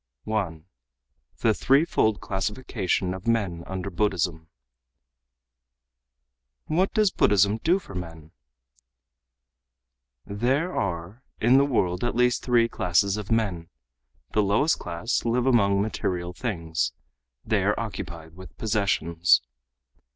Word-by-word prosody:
1. 95 -8 -3 0.8
The 110 - +4
Threefold 135 -5 +2
Classification 95 -2 -2
of 95 +4 -8
Men 100 -8 0
Under 95 +1 -4
Buddhism 85 -4 -1 2.2
"What 180 +5 +1
does 215 -3 +3
Buddhism 100 +2 +3
do 170 +9 +3
for 170 - -11
men?" 80 -3 -8 1.9
"There 130 - -1
are 90 +4 -3 0.2
in 125 +4 +5
the 140 - +4
world 90 -9 0
at 120 - -1
least 125 0 +2
three 120 -2 +3
classes 95 -1 +1
of 105 -1 -6
men. 95 -8 0 0.6
The 105 - +2
lowest 105 +11 +2
class 85 +7 -2
live 120 +1 +1
among 100 -6 +3
material 90 -4 -3
things, 80 - -2 0.5
they - - +1
are - - +1
occupied 80 -1 -6
with 95 +1 -13
possessions. 85 - +2
100 Hz, 110 wpm, -25 LUFS, 85-115 Hz, 2.2 s, in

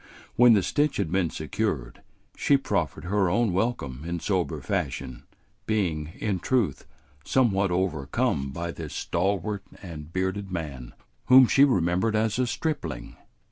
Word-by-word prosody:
When 120 -1 +7
the 100 -3 +3
stitch 145 +5 +1
had 80 - -1
been 90 -2 +1
secured, - - -3 0.3
she 140 - +3
proffered 135 - -2
her 95 +1 +1
own 115 +1 +1
welcome 80 - -2
in 85 +1 -3
sober 85 -2 -1
fashion, 65 -1 -3 0.4
being, 80 -8 -1
in 100 -4 -1
truth, 110 - 0 0.4
somewhat 100 - +2
overcome 75 -6 0
by 85 +4 -4
this 80 -3 -7
stalwart 100 +3 -1 0.2
and 80 -4 -8
bearded 95 +2 -2
man 70 -8 -6 0.3
whom 130 0 +8
she 135 +3 +5
remembered 95 -3 +2
as 110 +2 +1
a 130 - +2
stripling. 120 - -3
95 Hz, 140 wpm, -26 LUFS, 80-110 Hz, 0.4 s, whom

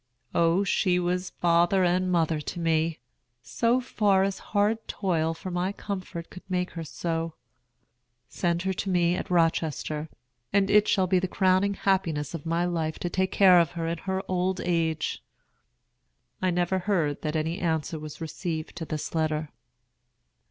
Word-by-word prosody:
O, 170 +3 +3
she 185 -2 +2
was 180 +1 -1
father 175 +2 +3
and 180 +1 +2
mother 165 -3 +1
to 175 - -5
me, 165 -1 +1 0.5
so 235 +2 +1
far 205 -6 +2
as 195 0 -1
hard 215 +2 0
toil 165 -4 0
for 185 +3 -7
my 180 +2 0
comfort 185 -5 -6
could 180 - -10
make 180 0 -1
her 165 - -5
so. 165 +1 -3 0.9
Send 175 -1 -1
her 190 0 0
to 195 +1 -3
me 175 -2 +3
at 190 - -4
Rochester, 160 -2 0 0.4
and 200 0 +2
it 210 0 +5
shall 190 -2 +3
be 185 0 +3
the 185 - -1
crowning 190 +2 +2
happiness 170 -8 0
of 165 -1 -6
my 170 +2 +1
life 165 -3 -2
to 175 - -3
take 190 +1 0
care 185 -3 +7
of 170 -1 +1
her 165 -1 -3
in 165 0 -2
her 190 +1 -2
old 185 +1 0
age." 165 -3 -1 1.2
I 185 - +2
never 180 +1 +1
heard 175 -7 0
that 155 0 -2
any 160 +4 -1
answer 160 -2 -1
was 150 -1 -8
received 160 0 -4
to 165 - -4
this 155 -1 -4
letter. 155 -1 -1
175 Hz, 165 wpm, -27 LUFS, 165-190 Hz, 1.2 s, care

